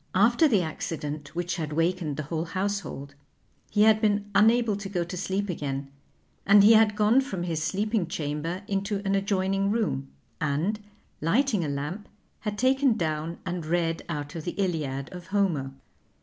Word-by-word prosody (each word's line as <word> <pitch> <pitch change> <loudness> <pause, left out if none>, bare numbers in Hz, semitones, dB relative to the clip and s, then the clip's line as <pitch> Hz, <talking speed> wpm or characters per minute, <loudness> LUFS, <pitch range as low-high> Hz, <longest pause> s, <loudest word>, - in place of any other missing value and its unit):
After 235 - +5
the 210 -10 +3
accident, 155 -1 -5
which 175 +1 -2
had 155 -3 -3
wakened 165 -2 0
the 155 - -2
whole 160 +3 -3
household, 185 -6 -3 0.6
he 210 - +3
had 215 0 +5
been 205 -2 +2
unable 220 +1 +4
to 200 -1 -6
go 180 -3 -1
to 175 +2 -7
sleep 195 +2 -2
again 140 -5 -4 0.5
and 200 0 +7
he 215 +3 +8
had 220 -1 +5
gone 215 +5 +4
from 195 -10 -4
his 165 -3 -2
sleeping 205 +2 0
chamber 165 +4 -3
into 200 0 -2
an 195 - +1
adjoining 195 0 +1
room, 200 -12 -1 0.3
and, 155 +9 0 0.4
lighting 210 - +2
a 150 - -2
lamp, 150 +9 -4 0.3
had 210 -2 -4
taken 260 0 +3
down 160 -1 -2
and 180 -2 -3
read 165 0 0
out 145 -3 -4
of 165 - -6
the 175 - -2
"Iliad" 150 -8 -2
of 180 -1 -9
Homer. 185 -9 0
185 Hz, 165 wpm, -27 LUFS, 155-205 Hz, 0.6 s, he